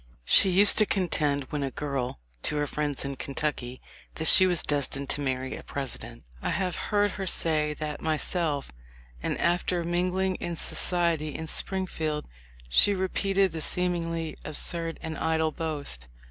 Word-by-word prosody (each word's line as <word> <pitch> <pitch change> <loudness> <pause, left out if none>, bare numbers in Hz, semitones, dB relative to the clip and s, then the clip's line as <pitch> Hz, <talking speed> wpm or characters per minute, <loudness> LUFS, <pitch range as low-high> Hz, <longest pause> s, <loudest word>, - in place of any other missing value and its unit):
She 195 - +6
used 200 +4 +7
to 215 - +4
contend 150 -7 +1
when 150 - -2
a 135 - -1
girl, 135 - -3 0.2
to - - 0
her 145 0 +1
friends 145 -2 -1
in 140 -1 -4
Kentucky, 135 -3 -3 0.4
that 160 - -3
she 185 +3 +8
was 175 -2 +1
destined 140 -1 -1
to 145 - -1
marry 130 -1 -2
a - - -8
President. 135 -3 -6 0.2
I - - -2
have 185 -1 -1
heard 205 0 +2
her 195 -2 -5
say 155 -3 +1
that 150 -1 -5
myself, 155 -2 -1 0.5
and - - -2
after 175 0 +1
mingling 180 +2 0
in 170 - -4
society 165 -3 +2
in 160 - -4
Springfield 160 -4 -3 0.4
she 200 - +4
repeated 195 0 +1
the 160 0 -5
seemingly 165 -2 -1
absurd 165 +2 -2
and 160 -1 -4
idle 160 -1 +1
boast. 145 - -4
160 Hz, 155 wpm, -27 LUFS, 145-180 Hz, 0.5 s, she